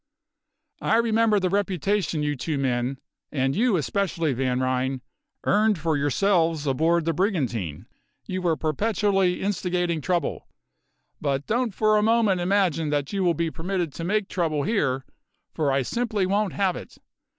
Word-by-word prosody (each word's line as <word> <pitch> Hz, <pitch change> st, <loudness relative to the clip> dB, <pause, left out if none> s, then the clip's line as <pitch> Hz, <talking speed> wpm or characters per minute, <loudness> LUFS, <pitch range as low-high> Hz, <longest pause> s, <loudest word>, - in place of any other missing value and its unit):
I 220 Hz, -, +2 dB
remember 225 Hz, -2 st, +3 dB
the 185 Hz, -2 st, 0 dB
reputation 195 Hz, -4 st, 0 dB
you 145 Hz, 0 st, 0 dB
two 150 Hz, +3 st, -3 dB
men 130 Hz, 0 st, -1 dB, 0.3 s
and 135 Hz, -1 st, 0 dB
you 225 Hz, -1 st, +3 dB
especially, 165 Hz, -2 st, -1 dB
Van 130 Hz, 0 st, 0 dB
Ryn 130 Hz, 0 st, -1 dB, 0.4 s
earned 210 Hz, 0 st, +3 dB
for 160 Hz, 0 st, 0 dB
yourselves 160 Hz, +2 st, +1 dB
aboard 160 Hz, +5 st, +2 dB
the 165 Hz, -, +1 dB
brigantine; 120 Hz, -, -1 dB, 0.4 s
you 185 Hz, -1 st, -3 dB
were 170 Hz, -3 st, +1 dB
perpetually 195 Hz, +2 st, +1 dB
instigating 180 Hz, -4 st, -1 dB
trouble. 175 Hz, -2 st, -1 dB, 0.7 s
But 140 Hz, -1 st, -1 dB
don't 235 Hz, -2 st, -1 dB
for 215 Hz, -1 st, +3 dB
a -, -, +3 dB
moment 220 Hz, -4 st, +3 dB
imagine 175 Hz, -4 st, +1 dB
that 145 Hz, +3 st, -1 dB
you 195 Hz, -1 st, 0 dB
will 175 Hz, -2 st, +2 dB
be 165 Hz, -1 st, -1 dB
permitted 175 Hz, 0 st, -3 dB
to 165 Hz, -, -6 dB
make 200 Hz, +3 st, 0 dB
trouble 155 Hz, -5 st, -1 dB
here, 135 Hz, -, 0 dB, 0.5 s
for 150 Hz, -3 st, 0 dB
I 135 Hz, 0 st, +1 dB
simply 215 Hz, -, -1 dB
won't 200 Hz, +1 st, 0 dB
have 195 Hz, -3 st, +1 dB
it. -, -, -10 dB
170 Hz, 150 wpm, -25 LUFS, 145-200 Hz, 0.7 s, remember